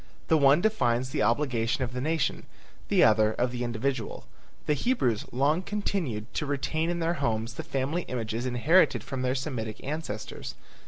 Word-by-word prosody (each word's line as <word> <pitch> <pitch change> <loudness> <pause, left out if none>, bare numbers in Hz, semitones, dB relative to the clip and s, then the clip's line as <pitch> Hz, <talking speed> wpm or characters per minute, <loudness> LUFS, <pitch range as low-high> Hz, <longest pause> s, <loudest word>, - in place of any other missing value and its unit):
The 160 - +5
one 140 +3 +5
defines 130 - +1
the - - -1
obligation 115 +1 +1
of 125 0 -4
the 125 - -3
nation, 155 0 -1 0.4
the - - +4
other 110 0 +5
of 125 +2 0
the 125 0 -3
individual. 120 0 -2 0.4
The 150 - +2
Hebrews 135 - 0
long 145 +7 +2
continued 180 - -3
to 150 - -2
retain 155 +3 -1
in 175 - -1
their 165 +1 +1
homes 115 -2 -1
the - - -5
family 140 +6 -1
images 115 0 -3
inherited 140 +9 +3
from 135 -1 -4
their 130 0 0
Semitic 125 -6 -4
ancestors. 145 -7 -5
130 Hz, 165 wpm, -28 LUFS, 115-155 Hz, 0.4 s, The